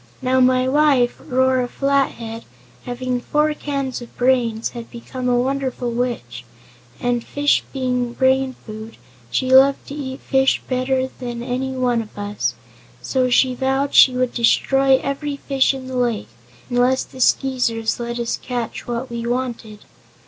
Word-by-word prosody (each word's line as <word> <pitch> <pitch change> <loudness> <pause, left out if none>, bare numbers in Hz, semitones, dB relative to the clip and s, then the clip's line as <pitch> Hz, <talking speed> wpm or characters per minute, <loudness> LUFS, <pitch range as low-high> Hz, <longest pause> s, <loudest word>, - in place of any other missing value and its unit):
"Now, 260 0 +1
my 255 0 +4
wife, 275 -3 +3
Rora 260 -2 +2
Flathead, 245 -4 -1 0.4
having 250 0 -3
four 300 +4 +1
cans 275 -4 -3
of 240 - -12
brains, 245 -3 +1
had 235 -2 -9
become 250 +2 -5
a 245 - +3
wonderful 260 -1 -1
witch, 230 - -3 0.6
and 245 -1 0
fish 290 0 +1
being 250 -2 -1
brain 260 0 +2
food, 220 +1 -9 0.3
she 255 - 0
loved 270 +1 +6
to - - -6
eat 265 -2 -5
fish 265 0 +2
better 260 0 0
than 240 -1 -5
any 260 +2 -2
one 250 -2 +1
of 215 -2 -12
us. 205 0 -2 0.5
So 255 -1 +1
she 255 +1 +3
vowed 270 +2 0
she 255 - +7
would 250 -1 0
destroy 270 +3 +3
every 280 +1 -3
fish 270 -2 +2
in 265 -1 -7
the 260 0 -5
lake, 240 -4 -1 0.4
unless 250 +1 +2
the 260 - -10
Skeezers 245 -4 +1
let 235 0 -4
us 235 -1 -2
catch 245 -2 -4
what 240 +1 -4
we 235 0 -4
wanted. 235 -4 -4
255 Hz, 150 wpm, -20 LUFS, 240-265 Hz, 0.6 s, she